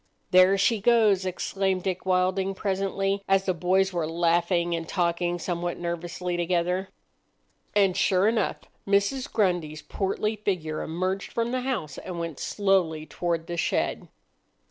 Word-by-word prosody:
"There 185 +2 +6
she 200 +2 +2
goes!" 210 -4 +4
exclaimed 190 0 -1
Dick 185 -1 -3
Wilding 185 +1 +1
presently, 195 0 -1
as 195 0 +3
the 185 - +1
boys 185 +3 +1
were 165 -3 -1
laughing 170 +1 +1
and 165 -1 -5
talking 175 -1 0
somewhat 175 0 -3
nervously 175 +1 -3
together. 180 +2 0 0.9
And, 195 -3 +4
sure 195 0 +3
enough, 220 -3 0 0.3
Mrs. 200 +8 +1
Grundy's 175 -8 0
portly 210 +2 -2
figure 180 -7 -2
emerged 185 +4 -3
from 235 0 -1
the 255 0 -1
house 225 - -3
and 180 -2 -7
went 165 -3 -5
slowly 185 -6 +1
toward 170 0 -2
the 170 0 -5
shed. - - -1
185 Hz, 140 wpm, -26 LUFS, 170-195 Hz, 0.9 s, There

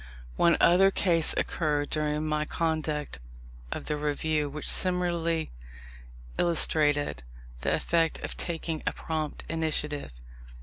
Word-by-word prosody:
One 170 - +4
other 185 +3 +6
case 170 -5 +3
occurred 150 -3 -1
during 150 0 0
my 150 0 0
conduct 155 - -2 0.5
of - - -5
the 150 - -1
Review, 150 0 -1
which 150 +1 -5
similarly 170 -3 +1 0.9
illustrated 150 - +2 0.4
the - - +1
effect 165 -1 +1
of - - -3
taking 165 -2 -3
a - - +1
prompt 155 -2 -4
initiative. 150 - -2
155 Hz, 115 wpm, -28 LUFS, 150-170 Hz, 0.9 s, other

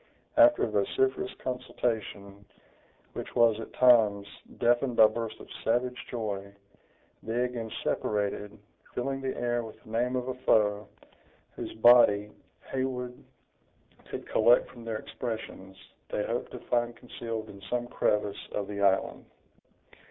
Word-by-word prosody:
After 300 0 +6
a - - +2
vociferous 390 -1 0
consultation, 110 -6 -3 0.7
which - - -7
was, 115 -2 +4
at 115 - -8
times, 110 -5 +5 0.3
deafened 120 +1 +2
by 110 - +8
bursts 115 0 -2
of - - -11 0.2
savage 125 +2 0
joy, 100 -4 -4 0.7
they 115 +2 -1
again 120 -3 -4
separated, 105 0 -2 0.4
filling 135 +2 -2
the 130 -1 -3
air 120 0 0
with 110 -1 -10
the 110 - -14
name 120 +3 0
of 125 0 -2
a 130 - -1
foe, 105 -5 +2 0.6
whose - - -7
body, 110 -3 +6 0.4
Heywood 125 -2 -3 0.9
could - - -6
collect 120 +3 +4
from 120 -2 -12
their 115 -1 -2
expressions, 110 -6 -6 0.3
they 105 - -1
hoped 120 +1 -3
to - - -6
find 120 -1 0
concealed 115 -3 -6
in 100 - -13
some 120 0 -1
crevice 105 -4 -1
of 100 -1 -2
the 100 -1 -5
island. 95 -1 +2
115 Hz, 135 wpm, -29 LUFS, 105-125 Hz, 0.9 s, by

